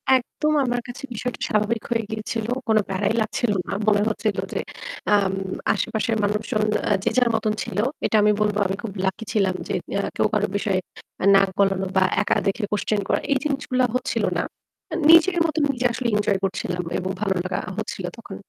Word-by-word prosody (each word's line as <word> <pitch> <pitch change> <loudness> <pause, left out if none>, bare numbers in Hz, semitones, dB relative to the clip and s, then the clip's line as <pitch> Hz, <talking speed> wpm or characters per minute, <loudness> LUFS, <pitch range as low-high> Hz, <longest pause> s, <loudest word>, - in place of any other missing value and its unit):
একদম। 300 +4 0
আমার 245 0 0
কাছে 245 - -8
বিষয়টা 245 +3 -4
স্বাভাবিক 215 +1 0
হয়ে 230 -1 +1
গিয়েছিল। 220 0 -3 0.2
কোন 220 - +4
প্যারাই 195 +3 0
লাগছিল 215 +1 0 0.2
না। - - -3
মনে 205 -1 +4
হচ্ছিল 215 -2 -1 0.2
যে - - -1 0.6
আম 195 -2 +2 0.4
আশেপাশের 225 0 -1
মানুষজন 210 +1 0 0.3
আ - - +4
যে - - +2
যার 245 -1 +4
মতন 215 -1 0
ছিল 180 - -6 0.3
এটা - - +1
আমি 210 0 +5
বলবো 210 -1 +1
আমি 190 - -2
খুব 225 - -4
লাকি 190 +4 -1
ছিলাম 195 -3 +2
যে - - -2 0.3
না - - -2
কেউ - - +3
কারো 210 0 +2
বিষয়ে 200 -2 0 0.4
আ - - +2
নাক 195 0 +5
গলানো 195 -1 +2
বা 190 - +6 0.2
একা 210 - +1
দেখে 210 +3 0
কোশ্চেন 210 0 0
করা - - +2
এই 275 - +4
জিনিসগুলা 270 -3 0
হচ্ছিল 255 - -1
না। - - +1 0.5
আ - - 0
নিজের 335 +2 +7
মত 310 -3 -1
নিজে 250 -2 -1
আসলে 245 +1 -2
এঞ্জয় 205 -2 +1
করছিলাম 180 -2 -2
এবং 185 0 -2
ভালো 195 -3 +1
লাগা 185 0 -2 0.2
হচ্ছিল 205 -4 -4
তখন। 200 -4 -9
215 Hz, 190 wpm, -23 LUFS, 195-235 Hz, 0.6 s, নিজের